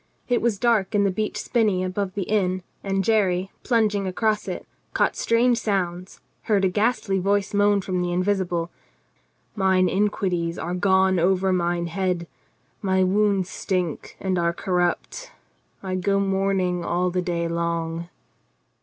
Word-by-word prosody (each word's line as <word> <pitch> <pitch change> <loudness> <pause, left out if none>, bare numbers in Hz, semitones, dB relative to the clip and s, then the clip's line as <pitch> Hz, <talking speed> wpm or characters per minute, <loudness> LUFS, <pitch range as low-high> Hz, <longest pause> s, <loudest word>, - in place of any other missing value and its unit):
It 245 -1 +1
was 230 -3 +1
dark 215 -3 +1
in 205 - +4
the 200 - +2
beech 215 +3 -2
spinney 210 -6 +1
above 185 +1 -3
the 200 - -1
inn, 185 -3 0 0.2
and 195 -1 0
Jerry, 190 -3 +1
plunging 210 -5 +1
across 215 +3 0
it, - - -5 0.3
caught - - +2
strange 235 +1 +2
sounds, 185 -3 -2 0.3
heard 200 -3 +3
a - - +3
ghastly 205 -1 0
voice 200 +1 0
moan 205 0 +3
from 185 -1 -2
the 175 0 -1
invisible: 180 -2 0 0.8
"Mine 190 -2 +3
iniquities 185 -4 0
are 175 +2 -3
gone 190 0 +3
over 190 +2 +2
mine 175 -1 0
head, 180 0 -1 0.6
my 190 -1 +2
wounds 195 -1 +1
stink 180 -5 -3
and 185 -2 -1
are 170 0 +1
cor 180 +1 -2
rupt; 180 - -2 0.5
yea, 190 - -5
I - - 0
go 195 +2 +1
mourning 190 -2 0
all 180 +1 0
the 180 0 0
day 170 -2 -1
long. 170 0 -2
190 Hz, 155 wpm, -24 LUFS, 180-205 Hz, 0.8 s, in